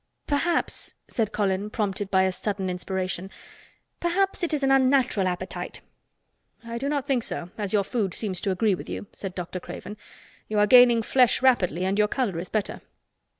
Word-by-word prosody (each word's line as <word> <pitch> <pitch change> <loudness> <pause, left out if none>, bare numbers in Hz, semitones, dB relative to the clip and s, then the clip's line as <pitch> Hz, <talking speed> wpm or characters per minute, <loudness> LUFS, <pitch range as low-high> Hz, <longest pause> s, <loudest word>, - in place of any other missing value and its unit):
"Perhaps," 310 +4 -1
said 220 -3 -1
Colin, 200 -1 0
prompted 205 -2 -2
by 190 -1 +4
a 190 - +2
sudden 190 0 -3
inspiration, 185 0 -3 0.7
"perhaps 380 +3 0
it 345 - 0
is 295 -2 -1
an 270 - +3
unnatural 260 -7 +3
appetite." 180 +1 -5 0.8
"I 235 0 -5
do 275 +3 -2
not 285 -2 -1
think 270 -4 +1
so, 175 -5 -3
as 205 -3 -3
your 205 -2 +3
food 200 -4 -2
seems 195 -5 -2
to 200 - -1
agree 195 +2 +2
with 180 - -6
you," - - -5
said 190 -2 -6
Dr. 180 0 -5
Craven. 210 +4 -8 0.5
"You 215 - -2
are 210 - +5
gaining 240 0 +7
flesh 250 +1 +3
rapidly 185 -8 +3
and 195 +2 0
your 210 - +4
color 210 -7 -1
is 175 - -6
better." 215 -2 -2
210 Hz, 180 wpm, -25 LUFS, 190-255 Hz, 0.8 s, gaining